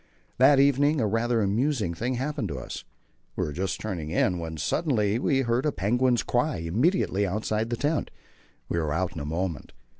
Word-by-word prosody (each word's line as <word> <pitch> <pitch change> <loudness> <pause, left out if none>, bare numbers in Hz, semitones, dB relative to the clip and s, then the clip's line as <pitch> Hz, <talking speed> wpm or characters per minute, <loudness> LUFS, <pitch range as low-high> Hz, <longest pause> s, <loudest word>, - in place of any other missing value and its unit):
That 135 +2 +6
evening 140 +2 +4
a 115 - +2
rather 115 +2 +1
amusing 110 - 0
thing 120 +8 -2
happened 130 -3 -2
to 70 -5 -5
us. 65 - -7 0.5
We - - -1
were 75 - -5
just 95 +4 -2
turning 90 -8 -4
in 90 +2 +1
when 80 -1 -5
suddenly 105 - +1
we 135 0 +2
heard 120 0 0
a 150 - +1
penguin's 120 +4 +1
cry 125 +4 0
immediately 100 - +1
outside 110 +3 -1
the 120 - -2
tent. 150 +4 0 0.6
We 85 - -1
were 80 -2 -1
out 90 +2 -1
in 80 - -6
a 70 - -5
moment. 85 +2 -3
110 Hz, 185 wpm, -26 LUFS, 90-130 Hz, 0.6 s, That